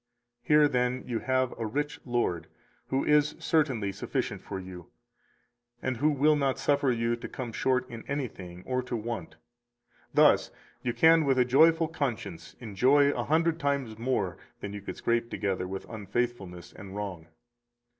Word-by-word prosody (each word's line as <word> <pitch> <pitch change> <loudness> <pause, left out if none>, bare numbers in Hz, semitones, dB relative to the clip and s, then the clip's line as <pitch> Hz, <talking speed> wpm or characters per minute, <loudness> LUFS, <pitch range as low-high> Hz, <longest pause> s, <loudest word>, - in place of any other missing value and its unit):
Here, 150 -1 +5
then, 125 -1 0
you 120 -3 -2
have 130 +1 +1
253 115 - -6
a - - -1
rich 145 +6 -3
Lord, 120 - -1 0.4
who 135 +1 0
is 150 0 +3
certainly 130 -11 +1
sufficient 95 - -3
for 95 - -6
you, 90 -2 -10 0.9
and 130 -1 -2
who 150 +6 +3
will 150 +1 +3
not 135 -3 0
suffer 140 0 +2
you 115 0 0
to 120 - -8
come 125 -3 -5
short 130 0 +1
in 115 -2 -9
anything 95 -11 -5
or 130 0 0
to 125 -1 -4
want; 110 -8 -5 0.8
thus - - +5 0.3
you 120 - -1
can 160 +7 +5
with 135 -2 +2
a 125 - +4
joyful 160 +6 +5
conscience 135 - -4
enjoy 130 +6 +3
a - - -3
hundred 165 +2 +2
times 140 -7 -1
more 105 -8 -1 0.2
than 100 - -6
you 105 - -6
could - - -7
scrape 115 0 0
together 95 -4 -2
with 95 +1 -6
unfaithfulness 100 -4 -4
and 95 -1 -10
wrong. 95 -6 -5
125 Hz, 165 wpm, -28 LUFS, 105-140 Hz, 0.9 s, Here